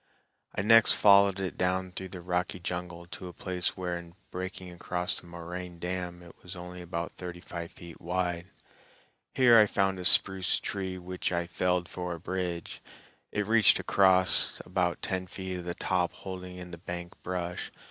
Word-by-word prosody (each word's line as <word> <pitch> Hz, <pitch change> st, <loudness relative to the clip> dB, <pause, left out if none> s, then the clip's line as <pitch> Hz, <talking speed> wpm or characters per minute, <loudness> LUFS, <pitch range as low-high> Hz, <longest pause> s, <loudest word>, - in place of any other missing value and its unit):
I 95 Hz, -, -1 dB
next 115 Hz, +1 st, +7 dB
followed 100 Hz, -1 st, +5 dB
it 95 Hz, -2 st, -4 dB
down 90 Hz, 0 st, 0 dB
through 95 Hz, +1 st, -6 dB
the 90 Hz, -1 st, -9 dB
rocky 90 Hz, +1 st, -2 dB
jungle 90 Hz, 0 st, -6 dB
to 90 Hz, +1 st, -9 dB
a 90 Hz, -, -9 dB
place 90 Hz, 0 st, -2 dB
where 90 Hz, -1 st, -3 dB
in 85 Hz, 0 st, -14 dB, 0.2 s
breaking 95 Hz, 0 st, -6 dB
across 90 Hz, 0 st, -1 dB
the -, -, -16 dB
moraine 85 Hz, +1 st, -8 dB
dam 90 Hz, 0 st, -5 dB
it 85 Hz, -, -15 dB
was 90 Hz, -, -9 dB
only 90 Hz, 0 st, -9 dB
about 85 Hz, -1 st, -5 dB
thirty 90 Hz, -1 st, -8 dB
five 85 Hz, -1 st, -7 dB
feet 85 Hz, -1 st, -13 dB
wide. 90 Hz, 0 st, -2 dB, 0.9 s
Here 120 Hz, -3 st, +7 dB
I 105 Hz, -, +6 dB
found 95 Hz, -2 st, 0 dB
a 90 Hz, -, -5 dB
spruce 95 Hz, -2 st, +5 dB
tree 95 Hz, -2 st, -4 dB
which 90 Hz, +1 st, -4 dB
I 85 Hz, -1 st, -1 dB
felled 90 Hz, 0 st, -1 dB
for 90 Hz, +1 st, -5 dB
a -, -, -11 dB
bridge; 90 Hz, -1 st, -4 dB, 0.5 s
it 105 Hz, -1 st, -1 dB
reached 110 Hz, -1 st, +5 dB
across, 95 Hz, -1 st, +6 dB
about 90 Hz, -1 st, -1 dB
ten 95 Hz, -1 st, -2 dB
feet 95 Hz, 0 st, -6 dB
of 90 Hz, -, -9 dB
the 85 Hz, 0 st, -4 dB
top 90 Hz, -2 st, -1 dB
holding 90 Hz, -1 st, -8 dB
in 90 Hz, -1 st, -9 dB
the 85 Hz, -, -9 dB
bank 85 Hz, 0 st, -8 dB
brush. 90 Hz, -1 st, -4 dB
90 Hz, 180 wpm, -29 LUFS, 85-95 Hz, 0.9 s, next